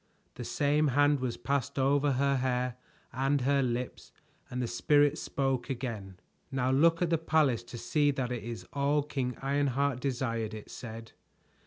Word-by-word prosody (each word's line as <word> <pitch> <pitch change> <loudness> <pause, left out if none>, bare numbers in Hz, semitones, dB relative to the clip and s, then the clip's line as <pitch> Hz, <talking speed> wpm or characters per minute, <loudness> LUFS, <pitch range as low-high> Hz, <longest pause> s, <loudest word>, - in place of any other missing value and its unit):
The - - -7
same 150 +1 +2
hand 145 0 +4
was 125 -2 -2
passed 140 +1 -2
over 140 +1 +3
her 140 +1 +2
hair 125 -1 0 0.4
and 135 +2 +1
her 140 +2 +3
lips 125 -1 -3 0.4
and 125 - -4
the 125 - 0
Spirit 145 +5 +3
spoke 135 -2 -1
again. 110 -8 -5 0.3
"Now 130 -1 +1
look 165 +5 +4
at 170 - 0
the 165 - +3
palace 155 -7 +2
to 120 - -8
see 145 +4 +1
that 130 -3 -1
it 120 -3 -3
is 115 0 -6
all 140 +1 +2
King 130 -4 -3
Ironheart 140 -1 +1
desired," 115 -5 -2
it 105 - -10
said. 115 -1 -8
135 Hz, 165 wpm, -30 LUFS, 125-145 Hz, 0.4 s, hand